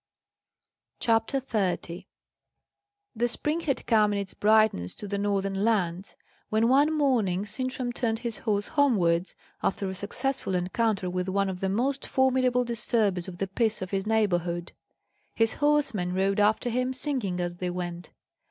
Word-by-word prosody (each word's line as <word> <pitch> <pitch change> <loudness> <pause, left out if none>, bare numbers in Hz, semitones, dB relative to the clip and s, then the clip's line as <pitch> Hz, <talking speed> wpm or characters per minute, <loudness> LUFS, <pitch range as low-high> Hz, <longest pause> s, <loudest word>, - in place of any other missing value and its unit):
CHAPTER 225 +3 +1
30 190 -6 -2 1.1
The 235 +2 +1
spring 300 +7 0
had 295 -5 -2
come 215 -3 +3
in - - -1
its 200 -2 -3
brightness 215 - +3
to 205 - -7
the 200 0 -2
northern 195 -1 -1
lands, 190 -5 0 0.3
when 220 +2 +2
one 285 +4 +4
morning 235 - +1
Sintram 255 +2 -3
turned 225 -2 -1
his 235 -1 -4
horse 205 -2 -1
homewards, 190 - +2 0.3
after 195 0 -1
a 190 - -3
successful 215 +2 -2
encounter 190 +2 0
with 180 +1 -2
one 195 +1 +1
of 185 -1 -5
the 190 - -1
most 260 +7 -1
formidable 255 -1 +2
disturbers 220 -6 0
of 180 -2 -8
the 195 - -1
peace 215 +1 0
of 185 - -7
his 195 +1 -1
neighbourhood. 175 -6 0 0.6
His 225 -1 +2
horsemen 280 -12 +2
rode 195 +1 +1
after 215 +3 +2
him, 255 +2 0
singing 255 -9 -2
as 175 0 -3
they 180 0 -2
went. 175 -1 -5
210 Hz, 150 wpm, -27 LUFS, 185-245 Hz, 1.1 s, one